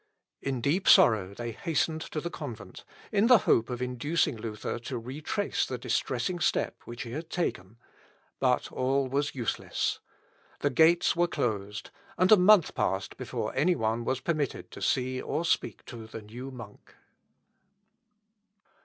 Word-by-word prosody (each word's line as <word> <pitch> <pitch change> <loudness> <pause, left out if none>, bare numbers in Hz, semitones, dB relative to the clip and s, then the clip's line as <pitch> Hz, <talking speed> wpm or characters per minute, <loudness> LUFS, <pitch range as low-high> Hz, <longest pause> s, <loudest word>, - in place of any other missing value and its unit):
In 135 -3 -2
deep 160 +10 +1
sorrow 100 -4 +5
they 120 +1 -4
hastened 160 +6 -1
to 155 - -4
the 170 +3 -5
convent, - - -8 0.3
in 210 +1 +3
the 250 -1 +8
hope 115 - +3
of 125 0 -3
inducing 125 +5 0
Luther 110 0 -5
to 120 +2 -5
retrace 145 - -2
the 125 - -3
distressing 125 +6 -1
step - - +1
which 120 0 -6
he 115 - -8
had 160 +5 -6
taken; 115 - -3 0.6
but - - +1
all 135 +1 +1
was 140 +3 -1
useless. 120 -4 -2 0.6
The - - +1
gates 165 +6 +4
were 175 0 +3
closed, 105 -9 -3 0.3
and 185 +2 +3
a - - +11
month 195 -2 +5
passed - - -1
before - - -4
any 175 +6 +3
one 115 0 -1
was 130 +2 -1
permitted 150 -3 -2
to - - -10
see 130 0 0
or 165 - -2
speak - - -1
to 115 -2 -9
the 110 0 -8
new 120 +5 -8
monk. 120 -6 -12
130 Hz, 155 wpm, -29 LUFS, 115-165 Hz, 0.6 s, a